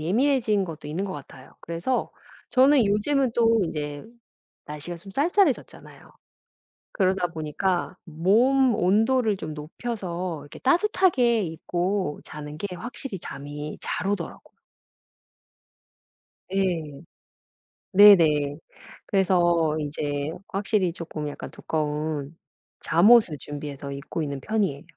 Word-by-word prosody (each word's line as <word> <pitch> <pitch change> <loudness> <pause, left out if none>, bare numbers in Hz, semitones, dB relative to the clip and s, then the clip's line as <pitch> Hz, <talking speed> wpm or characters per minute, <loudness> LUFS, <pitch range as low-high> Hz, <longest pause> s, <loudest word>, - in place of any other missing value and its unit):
예민해진 215 - +2
것도 155 -3 -8
있는 175 +6 -2
것 190 - -4
같아요. 145 -4 -11
그래서 170 +10 -2 0.4
저는 265 -1 +5
요즘은 240 +6 +1
또 230 -1 +4
이제 150 -2 -5 0.6
날씨가 150 +4 -6
좀 195 +3 -13
쌀쌀해졌잖아요. 340 0 0 0.8
그러다 185 -2 +1
보니까 170 +3 -2
몸 230 - +3
온도를 220 +3 +2
좀 155 - -6
높여서 175 0 -5
이렇게 145 - -12
따뜻하게 270 - +3
입고 175 +1 -2
자는 150 0 -8
게 200 - -3
확실히 235 -1 -6
잠이 145 +1 -7
잘 - - -3
오더라고요. 205 - -4 2.0
예. 165 -7 -1 0.9
네네. 160 -8 +6 0.5
그래서 175 -5 +2
인제 145 0 -3 0.2
확실히 195 -2 0
쪼끔 155 -3 -5
약간 145 - -7
두꺼운 150 -1 -3 0.5
잠옷을 190 -1 +5
준비해서 145 -1 -7
입고 145 +3 -5
있는 140 -2 -4
편이에요. 195 -7 -1
175 Hz, 250 characters per minute, -25 LUFS, 150-215 Hz, 2.0 s, 네네